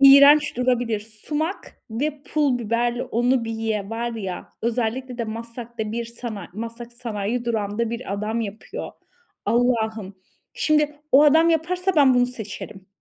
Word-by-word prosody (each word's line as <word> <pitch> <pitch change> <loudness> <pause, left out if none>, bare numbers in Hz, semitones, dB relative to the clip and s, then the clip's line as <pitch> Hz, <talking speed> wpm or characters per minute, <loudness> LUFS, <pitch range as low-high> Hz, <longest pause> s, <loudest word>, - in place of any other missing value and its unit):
iğrenç 280 +1 +8
durabilir. 245 -3 +1
Sumak 295 - -4
ve 285 +5 -2
pul 285 -5 +1
biberle 240 +2 0
onu 245 +1 +1
bir 225 - -4
ye! 220 -2 -2
Var 235 +1 -2
ya! 190 -5 -5
Özellikle 240 +2 -1
de 235 - 0
Maslak'ta 230 0 -5
bir 235 +1 -2
sana 230 -4 -6
Maslak 230 +3 -6
Sanayi 235 -1 -3
Durağı'nda 220 0 -1
bir 235 -3 -4
adam 215 +3 -1
yapıyor. 210 -1 -6 0.5
Allah'ım, 220 -4 +1 0.4
şimdi 300 -1 +2 0.2
o 275 - +8
adam 320 +3 +6
yaparsa 360 +4 +1
ben 275 -4 +6
bunu 245 0 +4
seçerim. 215 -4 -7
235 Hz, 140 wpm, -23 LUFS, 220-260 Hz, 0.5 s, iğrenç